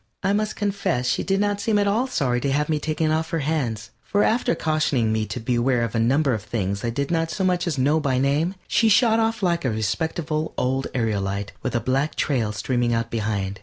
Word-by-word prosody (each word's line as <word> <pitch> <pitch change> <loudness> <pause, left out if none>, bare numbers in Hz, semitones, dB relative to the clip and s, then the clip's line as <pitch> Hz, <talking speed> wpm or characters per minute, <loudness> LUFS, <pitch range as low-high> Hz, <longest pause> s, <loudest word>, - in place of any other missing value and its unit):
I 195 +1 +2
must 215 +1 -1
confess 200 -11 -1
she - - +1
did 195 0 0
not 205 0 0
seem 220 -1 +1
at 205 0 +2
all 225 +6 +1
sorry 125 - 0
to 140 - 0
have 150 +2 0
me 155 -1 +1
taken 155 +1 -1
off 160 +1 0
her 165 - -1
hands, 115 -9 -2
for 205 - +1
after 245 +2 +2
cautioning 145 -8 +1
me 110 -1 -1
to - - -4
beware 120 +1 +1
of 115 - -3
a 115 - 0
number 135 +4 +2
of 110 - -2
things 100 -2 -3
I 120 - 0
did 140 +5 -2
not 165 -1 +1
so 165 +4 -2
much 180 -1 +1
as 155 -5 -1
know 145 +5 +3
by 140 -4 0
name, 145 +8 +1
she 225 - +3
shot 225 +1 +4
off 225 -2 0
like 170 -2 +1
a 130 - +1
respectable 155 - -2
old 130 +1 0
aerolite 100 -4 -1
with - - -3
a - - +3
black 135 +6 0
trail 120 -7 0
streaming 120 +2 0
out 115 0 -2
behind. 105 -3 -2
140 Hz, 230 wpm, -23 LUFS, 115-170 Hz, -, shot